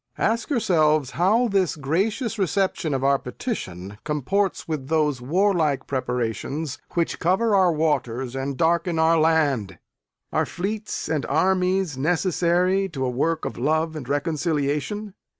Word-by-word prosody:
Ask 230 +5 0
yourselves 155 - +2
how 215 +8 +3
this 195 -5 +1
gracious 205 - -1
reception 190 -5 0
of 130 - -2
our 140 0 +3
petition 100 - -6
comports 170 +7 -1
with 150 -5 -3
those 150 -4 +1
warlike 160 0 +1
preparations 130 +3 -3 0.2
which 170 -1 0
cover 195 +6 +2
our 185 -3 +4
waters 135 -5 -1
and 135 0 -3
darken 170 +2 +1
our 160 +1 +4
land. 145 - +1 0.6
Are - - +1
fleets 210 +4 -4
and 155 -3 -1
armies 185 -1 +1
necessary 180 +4 +1
to 135 -6 -3
a 125 - -1
work 160 +6 0
of - - -5
love 155 +4 0
and 135 -4 -7
reconciliation? 155 +6 -1
160 Hz, 130 wpm, -24 LUFS, 140-185 Hz, 0.6 s, our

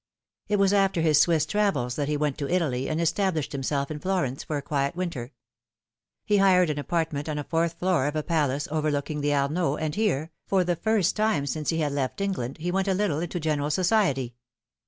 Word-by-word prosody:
It 210 0 +1
was 195 0 +3
after 195 -4 +2
his 155 -2 +5
Swiss 160 -3 +3
travels 155 -10 0
that 145 -2 -1
he 150 0 0
went 145 -2 -1
to 140 - -3
Italy, 150 -8 0
and 155 +1 -1
established 170 -2 0
himself 140 +1 -2
in 150 - -4
Florence 170 -7 -1
for 150 - -3
a - - -3
quiet 140 +1 -1
winter. 160 -9 -4 0.9
He 210 - +3
hired 180 -4 +4
an 145 - -3
apartment 160 -1 -2
on 150 - -2
a 145 - -2
fourth 165 +2 0
floor 175 -7 +1
of 150 - -3
a 155 - -1
palace 145 -4 0
overlooking 150 -1 -1
the 145 0 +1
Arno, 145 +2 +1
and 155 -1 -3
here, 170 -8 0 0.2
for 190 -2 +2
the 175 0 0
first 215 -1 +1
time 215 -10 +1
since 150 +1 -3
he 165 -1 0
had 150 -2 0
left 140 +2 -2
England, 185 -11 -2
he 175 +3 -3
went 190 +1 0
a 190 - +2
little 185 -7 0
into 175 +1 -3
general 150 -2 -1
society. 170 - +1
155 Hz, 210 wpm, -26 LUFS, 145-185 Hz, 0.9 s, his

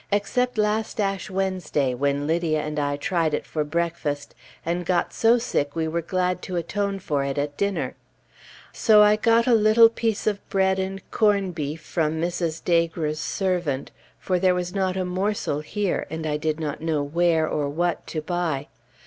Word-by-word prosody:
except 250 +5 0
last 215 +2 0
Ash 195 -1 -1
Wednesday 185 -8 -1
when 140 +2 0
Lydia 160 0 +1
and 150 0 -3
I 145 0 0
tried 160 -1 0
it - - -4
for 155 - -2
breakfast, 150 -2 -2 0.3
and 175 +2 -1
got 175 0 0
so 230 +2 +4
sick 145 - -1
we 160 -1 0
were 170 +2 -1
glad 180 +1 -1
to 185 - -5
atone 195 +4 -1
for 145 -7 -1
it 140 0 -3
at 145 0 -2
dinner. 200 +4 -1 0.8
So 210 -2 +6
I 210 0 +5
got 230 +2 +3
a 250 - +4
little 225 +1 +6
piece 225 -2 -2
of 205 -2 +1
bread 190 0 +2
and 190 0 -4
corn 200 -4 +2
beef 155 -1 -4
from 155 -1 -1
Mrs. 165 0 -2
Daigre's 165 -3 +1
servant, 175 -5 -1 0.3
for 185 -1 -1
there 185 0 +3
was 180 0 -3
not 190 -2 0
a 185 - -1
morsel 185 -4 -1
here, 195 +5 -2
and 160 +1 -5
I 150 -1 0
did 155 +1 -1
not 150 -2 -4
know 155 -3 0
where 160 +1 +2
or 145 -2 -1
what 170 +2 -1
to 155 -2 -4
buy. 160 -5 -2
175 Hz, 180 wpm, -24 LUFS, 155-195 Hz, 0.8 s, So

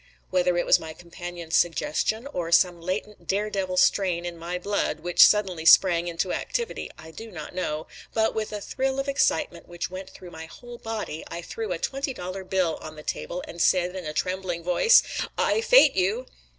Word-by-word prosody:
Whether 180 -1 +2
it 175 - +1
was - - +5
my 160 0 -8
companion's 175 -1 -6
suggestion 175 - +1
or 170 -2 -3
some 175 0 +4
latent 195 +4 -5
dare 210 +2 0
devil 185 -2 -2
strain 180 -2 +2
in 175 -1 -5
my 170 +2 -4
blood 180 -4 -2
which 175 +1 +6
suddenly 190 -6 +3
sprang 170 0 +6
into 175 +2 -2
activity 470 -1 -3
I 160 - -12
do 225 +7 -9
not 160 -7 -8
know; 155 -4 -3 0.3
but 220 0 +1
with 215 -1 -3
a 210 -1 -5
thrill 265 +5 -2
of 275 - -2
excitement 175 -10 0
which 175 +1 -5
went 185 +1 -7
through 180 -2 -12
my 160 0 -9
whole 240 +6 -12
body 220 -8 -5
I 170 - -7
threw 220 +3 -5
a 175 - -1
twenty 275 - -3
dollar 185 +2 -6
bill 185 -3 0
on 155 0 -9
the 150 - -11
table 180 +3 -4
and 170 - -6
said 180 0 +2
in 185 -3 -6
a - - -3
trembling 185 -1 -2
voice: 180 - +5 0.3
"I - - +2
fate - - +6
you." 200 +7 0
180 Hz, 195 wpm, -25 LUFS, 170-210 Hz, 0.3 s, which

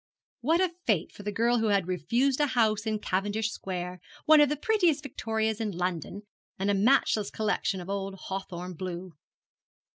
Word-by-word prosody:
What 320 +7 +2
a 370 -2 +2 0.2
fate 190 -7 +1
for - - -11
the 210 +1 -3
girl 235 +3 +2
who 225 - +1
had 200 -4 +2
refused 235 - +1
a 295 - +3
house 220 -4 +1
in 215 -1 +1
Cavendish 205 +3 -1
square, 180 -2 -5 0.3
one 310 -1 +7
of 295 - +5
the 295 - -1
prettiest 345 -5 +2
victorias 220 -4 -2
in 205 -5 -3
London, 180 +2 -3 0.3
and 195 +1 +1
a - - +2
matchless 210 0 +3
collection 215 -2 -1
of 175 - -8
old 195 0 -3
hawthorn 185 -2 -6
blue! 180 +1 -6
210 Hz, 175 wpm, -28 LUFS, 185-240 Hz, 0.3 s, one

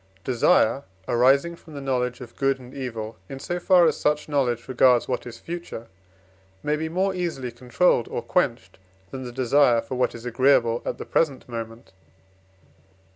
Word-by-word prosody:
PROP. 95 - -36
XVI. 95 0 -33
Desire 130 +1 +3 0.2
arising 140 +8 +3
from 160 -2 -15
the - - -5
knowledge 125 -2 -2
of 120 -2 -11
good 135 -1 +1
and 125 0 -13
evil, 115 -5 -6
in 135 - -6
so 175 +6 -4
far 180 -1 +5
as 155 - +3
such 150 0 0
knowledge 125 -6 0
regards 125 -1 +4
what 125 -1 -3
is 120 - -9
future, 170 -9 -7 0.7
may 150 - +1
be 160 +1 -3
more 190 +3 0
easily 165 -9 -3
controlled 125 +2 +1
or - - -4
quenched, - - -1 0.3
than 130 -1 -6
the 120 - -6
desire 125 0 +3
for 115 +3 -6
what 125 -1 0
is 115 +1 -10
agreeable 125 -1 +3
at - - -2
the - - -7
present 145 -5 0
moment. 115 -1 -7
130 Hz, 180 wpm, -24 LUFS, 120-150 Hz, 0.7 s, far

